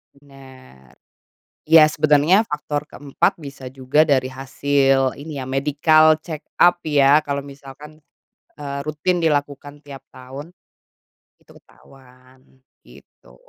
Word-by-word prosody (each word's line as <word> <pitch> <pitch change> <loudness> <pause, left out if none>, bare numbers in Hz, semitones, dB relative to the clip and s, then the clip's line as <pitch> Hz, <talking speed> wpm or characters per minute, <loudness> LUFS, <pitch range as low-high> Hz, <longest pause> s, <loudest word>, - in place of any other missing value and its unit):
Bener. 135 -2 -19 0.7
Ya, 160 -1 +7
sebenarnya 155 +7 +2
faktor 150 0 -5
ke-4 140 -2 -2
bisa 140 -4 -11
juga 135 +4 0
dari 130 -2 0
hasil 135 0 -1
ini 150 0 -9
ya, - - -5
medical 150 +4 +2
check-up 175 +2 0
ya, 145 0 +4
kalau 140 -2 -5
misalkan, 140 +2 -14 0.6
eee, 140 -1 -7
rutin 175 +4 -2
dilakukan 145 -2 -3
tiap 140 -2 -11 0.2
tahun, 135 +7 -11 0.9
itu - - -26
ketahuan, 130 -1 -22 0.5
gitu. - - -20
145 Hz, 105 wpm, -20 LUFS, 135-150 Hz, 0.9 s, Ya